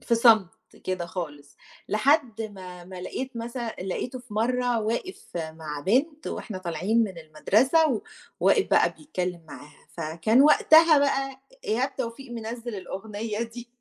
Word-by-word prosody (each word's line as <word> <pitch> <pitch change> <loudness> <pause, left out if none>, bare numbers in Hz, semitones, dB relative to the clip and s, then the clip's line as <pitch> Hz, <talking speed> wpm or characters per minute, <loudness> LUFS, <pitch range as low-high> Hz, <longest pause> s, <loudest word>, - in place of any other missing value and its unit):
في 235 - +1
صمت 220 -6 +5 0.3
كده 185 -2 -2
خالص، 145 -5 -7 0.3
لحد 235 0 +2
ما 185 -4 -9
ما 185 0 -9
لاقيت 260 +7 -5
مثلًا، 235 0 -4
لقيته 215 +7 -4
في 245 -4 -12
مَرَّة 245 +1 +1
واقف 230 - -3
مع 160 -2 -5
بنت 290 - +1
وإحنا 205 -5 -5
طالعين 185 +6 +1
من 190 -5 -7
المدرسة، 225 - +2 0.4
وواقف - - +4
بقى - - +4
بيتكلم 180 - -4
معاها، 150 0 -13
فكان 165 +9 +2
وقتها 315 +1 +7
بقى 270 -1 0 0.2
إيهاب 255 +5 -1
توفيق 245 +1 -5
منزِّل 230 0 -5
الأغنية 210 +4 -4
دي. 235 +1 -8
225 Hz, 135 wpm, -26 LUFS, 185-255 Hz, 0.4 s, وقتها